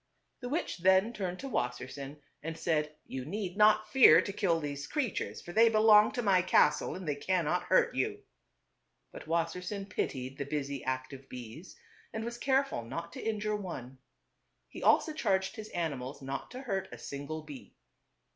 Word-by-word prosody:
The 245 - -5
witch 305 - -2
then 190 +5 +4
turned 185 -4 -3
to 275 - -5
Wassersein 130 - -4 0.2
and 165 +1 -5
said, 155 -3 0
"You 130 -1 -5
need 185 +4 -4
not 215 +1 +5
fear 210 -11 +8
to 195 +2 -2
kill 180 -5 +1
these 145 -2 -5
creatures, 290 -7 -2
for 175 - -9
they 230 +3 +6
belong 215 -1 +6
to 245 - -2
my 190 -3 +4
castle 150 -4 +3
and 185 -2 -7
they 145 - +1
cannot 180 +2 0
hurt 475 -1 +3
you." 420 -1 -2 0.9
But - - -10
Wassersein 180 +4 -2
pitied 130 -5 -3
the 140 - -2
busy, 140 -1 -3
active 130 +1 -4
bees, 125 +8 -9 0.4
and 220 0 -4
was 235 0 -5
careful 270 - +1
not 170 +9 -6
to - - -7
injure 215 -1 -1
one. 135 -10 -7 0.7
He - - -10
also 315 - +4
charged 190 -9 0
his 215 -2 -8
animals 145 -6 -3
not 135 +1 -5
to 255 - -8
hurt 195 -8 -2
a - - -8
single 145 +3 -6
bee. 145 -4 -11
175 Hz, 170 wpm, -31 LUFS, 145-215 Hz, 0.9 s, fear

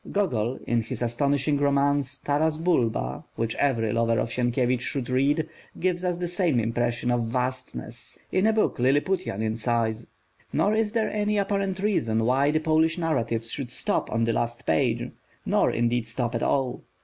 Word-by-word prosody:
Gogol, 130 - 0
in 120 -1 +1
his 115 +2 -5
astonishing 140 +4 +1
romance, 140 -1 +1
Taras 155 +3 0
Bulba, 115 - 0
which 115 0 -1
every 115 -6 +1
lover 115 0 +2
of 115 - 0
Sienkiewicz 125 0 +1
should 130 -1 -2
read, 145 +5 +2 0.3
gives 180 -1 0
us 180 -1 0
the 175 0 -2
same 175 -7 +1
impression 120 +1 0
of 120 -1 +1
Vastness, 125 +2 -4
in 190 +3 +3
a - - +5
book 215 - +1
Lilliputian 145 - +1
in 110 0 -1
size. 115 -1 -1 0.4
Nor 205 - +2
is 220 -1 0
there 225 -2 +1
any 210 0 0
apparent 195 -1 0
reason 115 - +1
why 135 +4 +3
the 155 +1 +2
Polish 160 +1 +2
narratives 115 -9 -1
should 135 -4 -4
stop - - -1
on 115 0 +1
the 115 0 +1
last 120 +1 -2
page, 80 - +1 0.3
nor - - +3
indeed 120 0 0
stop 120 +1 -2
at 115 - -1
all. 135 -3 0
130 Hz, 170 wpm, -26 LUFS, 115-160 Hz, 0.4 s, a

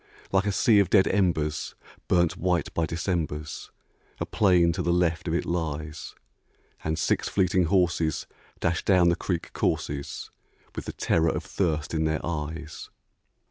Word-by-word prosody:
Like 95 +1 +2
a - - +2
sea 110 +1 +4
of 100 - +3
dead 95 -3 +5
embers, 85 -6 0 0.3
burnt 85 -2 +3
white 90 -1 0
by 80 -1 0
Decembers, 80 -3 -3 0.5
A - - -1
plain 90 -5 +3
to - - -2
the 85 - +1
left 85 -1 +1
of 80 - 0
it - - -1
lies; 80 -3 -4 0.7
And 80 0 -1
six - - 0
fleeting 95 -1 +2
horses 85 -3 +1 0.3
dash 85 +1 0
down 90 -3 +4
the 85 - +3
creek 85 -1 -3
courses 70 -1 -2 0.4
With - - -5
the - - -5
terror 80 0 +2
of - - -2
thirst 80 -4 -1
in 80 -1 +1
their 80 0 -1
eyes. 80 0 -5
85 Hz, 155 wpm, -26 LUFS, 80-90 Hz, 0.7 s, dead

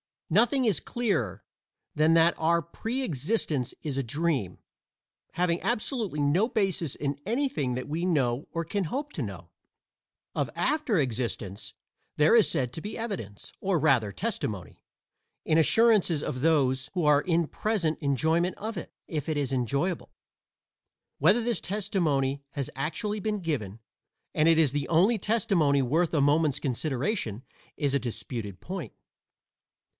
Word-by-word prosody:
Nothing 240 - +4
is 215 -6 +2
clearer 125 - -1 0.5
than 155 +2 +4
that 165 +1 +5
our 170 +1 +3
pre 225 - -4
existence 150 - -1
is 145 -4 -3
a - - 0
dream, 135 - -1 0.7
having 175 0 +1
absolutely 220 - -1
no 160 +10 +3
basis 195 - 0
in 140 -1 -3
anything 230 - 0
that 130 - -4
we 160 +3 -2
know 135 -7 +1
or 165 - -2
can 190 +4 -2
hope 285 - -3
to - - -3
know. - - -6 0.8
Of - - -1
after 300 -9 +1
existence 115 - -2 0.4
there 150 +6 +4
is 230 -3 +6
said 125 -2 -1
to 160 - -5
be 210 - -5
evidence, 190 - -5
or 190 -2 +1
rather 125 -8 +3
testimony, 95 - -4 0.6
in 155 - +3
assurances 185 -2 +4
of 130 - -3
those 135 -4 +2
who 180 -3 0
are 145 -1 +5
in 170 0 +1
present 175 -3 -1
enjoyment 160 +5 +1
of 220 0 -5
it - - -7
if 155 -2 -3
it 155 - 0
is 140 -2 -1
enjoyable. 140 - -1 1.1
Whether 195 +11 +4
this 235 -4 -1
testimony 165 -9 0
has 140 -4 -3
actually 205 - -2
been 210 0 -1
given 115 - -3 0.5
and 155 - +3
it 165 -1 +5
is 155 -5 +4
the 145 -1 -2
only 195 +8 +3
testimony 180 -10 +2
worth 160 +7 +1
a 150 - +3
moment's 145 0 +3
consideration 135 - -2 0.3
is 145 -2 0
a 140 - +3
disputed 115 -5 -6
point. 185 -4 -6
160 Hz, 145 wpm, -28 LUFS, 135-195 Hz, 1.1 s, is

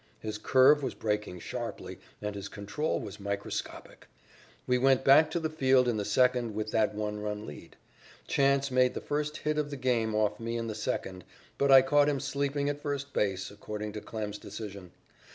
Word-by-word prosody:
His 110 -1 -5
curve 135 +6 +5
was 135 - -3
breaking 105 -5 -2
sharply, - - -6 0.2
and 105 0 -2
his 100 -1 -6
control 105 +11 -2
was 105 -1 -8
microscopic. 100 0 -5 0.6
We 125 0 +2
went 135 0 +4
back 150 +4 +6
to 170 - -1
the 160 - -1
field 130 -5 +3
in 120 -3 +1
the 105 - -2
second 120 0 +2
with 110 0 -3
that 110 -1 +1
one 105 0 -3
run 105 0 -4
lead. 75 - -11 0.5
Chance 140 0 +2
made 125 0 +3
the - - -2
first 150 +1 -2
hit 150 0 -1
of 145 -1 -1
the 140 - -5
game 115 -4 0
off 105 -1 +1
me 115 +1 -3
in 115 - -3
the 110 - -3
second, 95 -3 -4 0.4
but 140 0 +3
I 135 -1 +9
caught 145 +2 +4
him 140 -2 0
sleeping 140 +1 -1
at 145 0 -2
first 140 -1 -4
base, 95 -2 -1
according 105 +1 -6
to 105 - -6
Klem's 105 -2 -5
decision. 100 -4 -8
115 Hz, 190 wpm, -29 LUFS, 105-140 Hz, 0.6 s, I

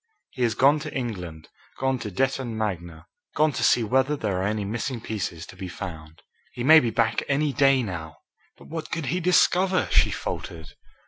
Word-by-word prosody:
He 130 - -8
has 115 -3 +2
gone 140 +5 +4
to 150 0 -6
England 90 - -5 0.3
gone 130 -1 0
to 110 - -5
Detton 130 +2 -1
Magna 85 -6 -4 0.3
gone 155 +1 +3
to - - -3
see 120 - +4
whether 130 +6 +2
there 100 -7 -2
are 95 - 0
any 105 -1 -2
missing 120 +4 -3
pieces 100 -7 -4
to - - -13
be 95 0 -6
found. 80 -4 -9 0.3
He 120 - -5
may 160 +4 +8
be 120 - 0
back 115 0 +1
any 145 0 +1
day 135 -2 +4
now." 80 -6 -6 0.4
"But - - -16
what 160 -1 -6
could 165 -2 -3
he 180 - 0
discover?" 180 +1 +3
she - - +4
faltered. 80 -2 -6
115 Hz, 190 wpm, -25 LUFS, 95-140 Hz, 0.4 s, may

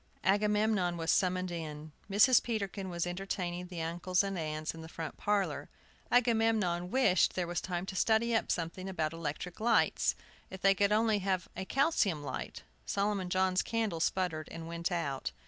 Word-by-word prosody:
Agamemnon 210 -3 +2
was 165 0 0
summoned 185 -1 +1
in. 155 -2 -6 0.2
Mrs. 210 +6 +6
Peterkin 200 -4 -3
was 170 -1 -2
entertaining 180 -1 -3
the 175 -2 -5
uncles 175 +3 0
and 195 -1 -3
aunts 155 -2 -3
in 165 - -9
the 160 - -9
front 165 -1 -6
parlor. 205 -1 -1 0.4
Agamemnon 225 -7 +2
wished 215 -6 +3
there 180 - 0
was 175 0 -2
time 180 -1 -3
to 190 - -6
study 220 +5 +2
up 225 - +1
something 180 +3 -3
about 160 -4 -1
electric 165 +2 -5
lights. 230 +2 +2 0.3
If 190 - -8
they 195 0 +6
could 200 +1 +2
only 215 0 +3
have 185 -2 -1
a 190 - -4
calcium 215 - +1
light! - - -5 0.2
Solomon 200 -2 -1
John's 185 0 +2
candle 220 -7 -1
sputtered 165 -2 -1
and 165 0 -7
went 170 +2 -3
out. 145 -6 -2
185 Hz, 165 wpm, -32 LUFS, 170-205 Hz, 0.4 s, Mrs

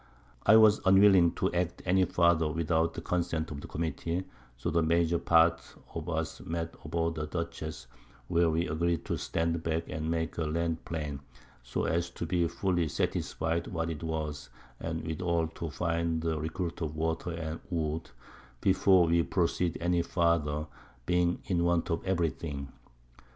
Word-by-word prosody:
I 110 - +8
was 110 -1 +7
unwilling 95 -3 +6
to - - -1
act 90 0 -1
any 95 +1 +4
farther 85 -2 +3
without 80 0 +1
the - - -4
Consent 85 -3 -1
of 70 -1 -6
the - - -8
Committee; 85 +2 -2 0.3
so 85 +8 -2
the 85 +1 +3
major 85 +1 +2
part 85 0 +4 0.3
of - - -5
us - - -2
met 85 0 -4
aboard 85 +2 -1
the 75 -1 -4
Dutchess, 80 -4 -5 0.4
where 85 -1 +3
we 80 +2 0
agreed 85 +1 0
to - - -1
stand 85 0 -1
back 80 0 -2
and 80 0 -3
make 80 -1 -1
the 80 -2 -1
Land 85 +1 -1
plain, 75 -4 -4 0.4
so - - -3
as 85 +1 0
to - - -2
be 85 0 +1
fully 90 -1 0
satisfied 80 +2 -1
what 80 -1 -2
it 75 - -6
was, 75 -5 -4 0.3
and 80 -1 -4
withal 85 0 0
to 80 0 -5
find 85 +1 -1
a 80 -1 +1
Recruit 85 +3 -4
of 80 -2 -3
Water 80 +2 -1
and 80 -1 -4
Wood 80 -2 -2 0.5
before 95 0 +5
we 85 +1 +3
proceed 85 -1 0
any 85 0 +2
farther, 85 -3 +1 0.4
being 90 0 +1
in 85 -3 +1
want 85 -1 +1
of 80 - -1
every 85 -4 +2
thing. 70 -4 -6
85 Hz, 165 wpm, -30 LUFS, 80-85 Hz, 0.5 s, I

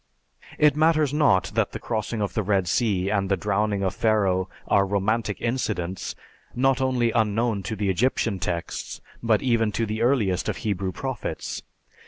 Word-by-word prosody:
It 150 -2 +4
matters 155 -2 +3
not 145 -11 +3
that - - 0
the - - -4
crossing 110 -1 -2
of 100 - -3
the 110 - 0
Red 100 -2 +1
Sea 100 -3 +1
and 100 -2 0
the 95 - +2
drowning 105 -1 0
of 95 - 0
Pharaoh 95 -4 +1 0.2
are 100 - +4
romantic 105 +2 0
incidents, 105 -7 -2 0.4
not 135 +1 +2
only 125 -3 +2
unknown 110 -1 +1
to 105 +4 -4
the 100 -1 0
Egyptian 110 -1 0
texts, 85 0 -4 0.2
but 115 -3 +2
even 115 -4 +2
to 115 - 0
the 110 +1 -3
earliest 110 -8 +1
of - - -2
Hebrew 100 -4 -2
prophets. 130 +1 -4
110 Hz, 165 wpm, -25 LUFS, 95-120 Hz, 0.4 s, It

